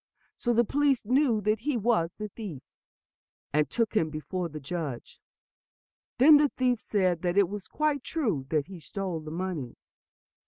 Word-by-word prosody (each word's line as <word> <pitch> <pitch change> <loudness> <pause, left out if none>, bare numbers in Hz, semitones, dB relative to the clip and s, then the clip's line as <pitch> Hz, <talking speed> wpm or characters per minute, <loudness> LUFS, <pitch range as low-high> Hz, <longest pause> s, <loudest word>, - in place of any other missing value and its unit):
So 240 - -1
the 235 0 +4
police 280 -2 +1
knew 250 -2 +3
that 215 +1 +1
he 285 +2 -1
was 210 -7 +1
the 210 -1 -5
thief, 190 - -8 0.9
and 150 -1 +2
took 230 -2 -1
him 160 -7 +2
before 170 +3 -4
the 155 0 -7
judge. 145 -4 -6 1.0
Then 295 +4 +8
the 290 0 +3
thief 250 -3 0
said 185 -7 0
that 175 +1 -1
it 200 -2 +5
was 205 -1 -6
quite 300 -3 0
true 210 - -1
that 150 -3 +1
he 185 -1 -10
stole 185 0 -4
the 155 0 -8
money. 165 -7 -4
200 Hz, 165 wpm, -28 LUFS, 165-240 Hz, 1.0 s, Then